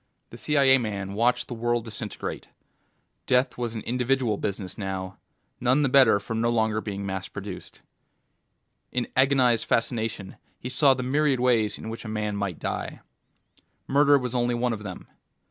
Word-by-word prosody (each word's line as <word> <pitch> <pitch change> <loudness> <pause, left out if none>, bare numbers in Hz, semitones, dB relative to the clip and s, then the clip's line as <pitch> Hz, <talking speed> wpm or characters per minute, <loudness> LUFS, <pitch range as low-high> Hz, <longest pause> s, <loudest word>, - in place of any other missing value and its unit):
The 120 - -9
CIA 135 +1 +4
man 100 -4 -4
watched 120 +4 +1
the - - -5
world 120 0 -1
disintegrate. 110 -1 -6 0.8
Death 125 0 +2
was 120 -2 -4
an 110 - -4
individual 125 -1 0
business 100 -2 -4
now, 95 -1 -5 0.4
and - - -11
none 130 +4 +3
the 135 - +2
better 130 -6 +6
for 100 - -6
no 115 +1 +1
longer 110 -2 +1
being 100 -2 -5
mass 95 -1 -4
produced. 100 -2 -9 1.1
In 125 -1 -1
agonized 130 -3 +3
fascination 115 -4 -2 0.2
he 125 - -6
saw 135 +1 +4
the 130 - -4
myriad 140 0 +1
ways 115 -4 +2
in - - -8
which 115 +1 -6
a - - -8
man 105 -1 -2
might 100 -4 -3
die. - - -4 0.9
Murder 145 +1 +5
was 125 -2 -3
only 120 -1 +1
one 120 0 0
of 110 - -6
them. 95 -4 -8
115 Hz, 165 wpm, -26 LUFS, 105-125 Hz, 1.1 s, better